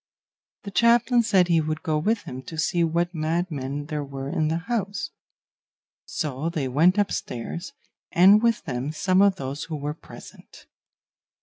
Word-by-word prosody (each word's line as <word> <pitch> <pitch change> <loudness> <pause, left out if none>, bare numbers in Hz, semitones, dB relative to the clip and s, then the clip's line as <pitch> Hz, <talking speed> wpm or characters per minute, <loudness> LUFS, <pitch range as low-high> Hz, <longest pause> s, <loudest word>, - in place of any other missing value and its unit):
The 200 - -7
chaplain 235 +4 +4
said 195 -6 +3
he 165 -2 +3
would 155 0 -3
go 155 -1 0
with 210 +7 0
him 130 +1 -7
to 160 - -7
see 170 +2 +1
what 170 +2 0
madmen 155 -4 -2
there 150 -1 -3
were 135 -1 -6
in 155 -1 0
the 160 +1 0
house; 230 - -2 0.9
so 150 -1 -3
they 150 -5 -2
went 165 +9 +3
upstairs, 175 - -3 0.4
and 195 +5 +6
with 230 -1 +1
them 130 +1 -3
some 185 +4 +2
of 200 -1 +4
those 140 -2 -5
who 160 - -5
were 145 0 -3
present. 155 - -14
165 Hz, 155 wpm, -24 LUFS, 150-195 Hz, 0.9 s, and